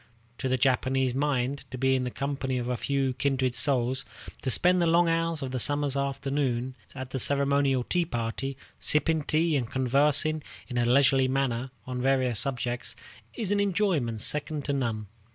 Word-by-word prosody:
To 130 - -2
the 130 - +1
Japanese 130 0 +1
mind, 135 -1 -1
to 130 - -7
be 130 +1 +2
in 130 -1 0
the - - -2
company 135 0 -3
of 120 -1 -3
a 125 - -1
few 135 +1 -1
kindred 130 -1 0
souls, 125 +1 +2 0.4
to 130 - -2
spend 180 +7 +4
the 170 - +2
long 170 +1 +4
hours 165 -2 0
of 130 -1 -5
a 130 - -1
summer's 145 +1 +1
afternoon 135 -2 -2 0.2
at 130 -1 -7
the 130 - -3
ceremonial 140 -1 +2
tea 175 +6 0
party, 130 +1 -4 0.2
sipping 155 +1 +2
tea 155 +2 +1
and 125 -5 -1
conversing 145 +4 +2 0.3
in 120 0 -3
a 120 - +1
leisurely 135 +1 +4
manner 130 -1 -1 0.2
on 125 -1 -4
various 130 -4 +1
subjects, 125 -2 0 0.4
is 215 -4 -2
an 205 - +2
enjoyment 180 - 0
second 150 +2 0
to 145 - -1
none. 115 -6 -2
135 Hz, 175 wpm, -27 LUFS, 125-145 Hz, 0.4 s, spend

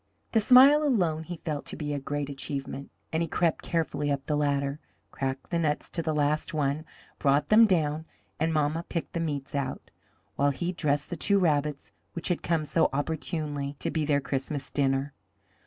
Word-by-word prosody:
The 225 - +4
smile 265 +6 +7
alone 180 - +1
he 175 0 -6
felt 150 -3 -3
to - - -6
be 150 -1 -3
a 145 - -1
great 145 +1 -3
achievement, 140 0 -5 0.2
and 160 - +1
he 165 - -1
crept 170 0 +1
carefully 160 -3 -1
up 140 -1 -2
the 150 - 0
ladder, 140 -1 0 0.3
cracked 135 0 -4
the 170 - +1
nuts 150 -3 -1
to 170 - 0
the 160 -1 -1
last 150 +2 0
one, 145 +1 0 0.3
brought 145 +1 +2
them 220 +1 +7
down, 160 -4 +1 0.3
and 160 +1 +1
mamma 155 +1 +1
picked 170 - -3
the 170 - -1
meats 145 -4 -3
out, 140 -2 -3 0.5
while 140 0 +3
he 170 +6 -2
dressed 150 -4 -1
the - - -1
two 200 +5 +2
rabbits 150 -5 0 0.2
which 170 - -4
had 175 - 0
come 165 -3 0
so 165 +2 +2
opportunely 145 -1 -3
to - - -3
be 160 - 0
their 145 -1 +2
Christmas 135 0 -3
dinner. 135 0 0
150 Hz, 190 wpm, -28 LUFS, 140-165 Hz, 0.5 s, smile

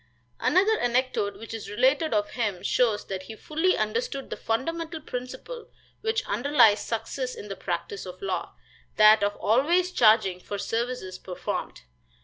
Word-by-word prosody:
Another 410 +4 +3
anecdote 245 -4 0
which 225 - -9
is 225 -2 -6
related 265 +8 +2
of 205 -1 0
him 210 -7 -2
shows 225 -4 +1
that 190 -1 -4
he 205 +4 -9
fully 320 - 0
understood 460 - -2
the - - -2
fundamental 325 +8 -2
principle 310 - -7 0.3
which 445 +1 0
underlies 225 -1 +4
success 250 +3 -3
in 210 - -9
the 195 - -4
practice 185 +2 -4
of 180 0 -9
law 195 -1 -3 0.4
that 215 0 +7
of 205 0 +1
always 335 - +2
charging 215 - +4
for 205 +2 -6
services 225 -4 -3
performed. 180 -2 -5
235 Hz, 145 wpm, -26 LUFS, 205-305 Hz, 0.4 s, that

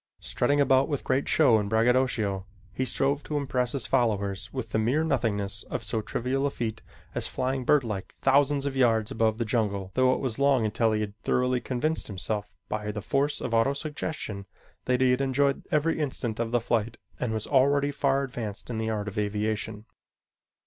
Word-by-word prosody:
Strutting 145 0 0
about 135 -1 +4
with 145 -3 -2
great 130 +2 0
show 130 -8 +5
and 100 -1 -3
braggadocio, 110 -4 +1 0.3
he 130 - -1
strove 140 +3 +1
to 150 - -3
impress 125 -3 -1
his 135 -5 -2
followers 100 -5 0
with 115 -5 -5
the 110 - +1
mere 125 +8 +2
nothingness 110 -10 -1
of - - -3
so 110 - 0
trivial 130 +5 -1
a - - 0
feat 115 -4 -4 0.3
as - - +1
flying 130 0 -2
birdlike 115 -10 +1
thousands 140 +1 +3
of 140 -1 -2
yards 115 -4 +2
above 110 -1 +1
the 115 - -1
jungle, 100 -4 -1
though 130 +1 +4
it - - -4
was 130 -3 -3
long 140 -4 +3
until 110 +1 +1
he 110 - 0
had 105 -1 -3
thoroughly 125 0 +1
convinced 155 +5 -1
himself 105 +1 -3
by 105 0 -3
the 105 -1 -6
force 145 +4 0
of 120 - -4
autosuggestion 135 -4 -1 0.4
that 125 0 +1
he 130 -1 +5
had 125 +2 +1
enjoyed 135 +1 +1
every 155 +2 +1
instant 125 -6 -3
of 115 -1 -1
the 120 +1 +2
flight 115 -1 -1 0.2
and 125 - -1
was 110 -1 -2
already 140 +1 +3
far 140 -1 +1
advanced 120 -4 -5
in 110 - -3
the 110 0 -1
art 105 -2 -2
of 105 0 -3
aviation. 105 +1 -2
120 Hz, 190 wpm, -27 LUFS, 110-135 Hz, 0.4 s, show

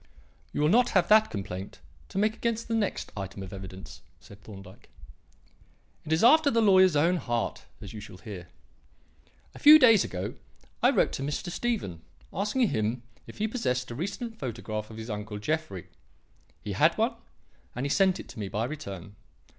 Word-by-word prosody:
"You - - -2
will 150 - +3
not 245 +6 +4
have 175 -2 +2
that 215 +1 +6
complaint 95 -1 -6 0.3
to - - -7
make 215 +2 +2
against 230 0 -2
the 230 - -2
next 220 -3 -1
item 95 -1 -6
of 95 - -9
evidence," 95 0 -9 0.2
said 100 +2 -15
Thorndyke. 95 -3 -13 1.2
"It 155 - -6
is 160 +4 +2
after 300 +5 +6
the 230 - +2
lawyer's 190 -5 +5
own 170 +5 +3
heart, 120 -7 -3 0.2
as 100 - -9
you 110 - -7
shall 105 -3 -11
hear. 95 -3 -9 1.1
A - - -12
few 300 +1 +10
days 225 -8 +6
ago 95 +2 -4 0.5
I - - +5
wrote - - +2
to - - -5
Mr. 145 +5 -3
Stephen 185 - -2 0.3
asking 210 +5 +1
him 110 +3 -1 0.2
if - - -11
he 215 - 0
possessed 125 - -2
a - - -5
recent 200 - -5
photograph 110 -4 -5
of 110 - -10
his 110 +1 -6
uncle 105 0 -5
Jeffrey. 105 - -3 0.8
He - - -4
had - - +3
one, - - +1 0.6
and 125 +3 -3
he - - -1
sent 190 0 +3
it - - -9
to 120 - -10
me 100 - -3
by 105 +3 -2
return. 100 - -7
135 Hz, 180 wpm, -28 LUFS, -, 1.2 s, few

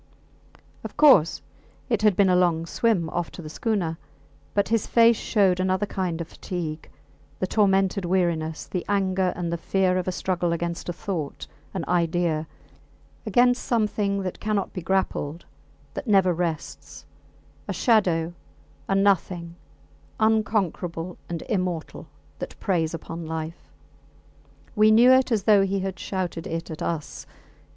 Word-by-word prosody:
Of - - -8
course 270 - +5 0.4
it 230 -5 0
had 210 -3 +4
been 200 0 +4
a - - +4
long 170 -2 +2
swim 185 -2 +1
off 175 -1 -2
to - - -8
the 155 - -8
schooner; 180 -6 -1 0.6
but 200 -1 +2
his 225 -2 +1
face 230 0 +5
showed 195 -5 +2
another 185 +2 +1
kind 180 -4 -3
of 170 - -4
fatigue, 165 -3 -6 0.5
the 185 - -1
tormented 195 -1 +2
weariness, 170 -3 0
the 180 - -4
anger 190 -2 +1
and 170 -1 -3
the 170 - -3
fear 185 +1 +1
of 180 - -4
a - - +1
struggle 175 -2 -1
against 170 +1 -3
a - - -1
thought, 165 -5 -4 0.3
an 180 - -2
idea 170 -2 0 0.8
against 245 0 +3
something 210 -4 0
that 185 - -5
cannot 210 -2 -1
be 180 - -5
grappled, 170 -3 -1 0.5
that 270 - -6
never 190 -4 +4
rests 165 -2 -4 0.6
a - - -2
shadow, 175 -8 +2 0.5
a 195 - +1
nothing, 180 -3 +1 0.6
unconquerable 195 -6 0
and 170 -1 -4
immortal, 180 -6 -3 0.3
that - - -7
preys 165 -4 0
upon 165 0 -7
life. 160 +1 -6 1.1
We 215 0 +5
knew 235 +4 +7
it 260 0 +4
as 215 -4 +1
though 205 -1 +5
he 195 0 0
had 190 -1 -4
shouted 180 -4 -3
it 165 0 -4
at 155 - -7
us. 160 -3 -4
185 Hz, 145 wpm, -25 LUFS, 170-200 Hz, 1.1 s, knew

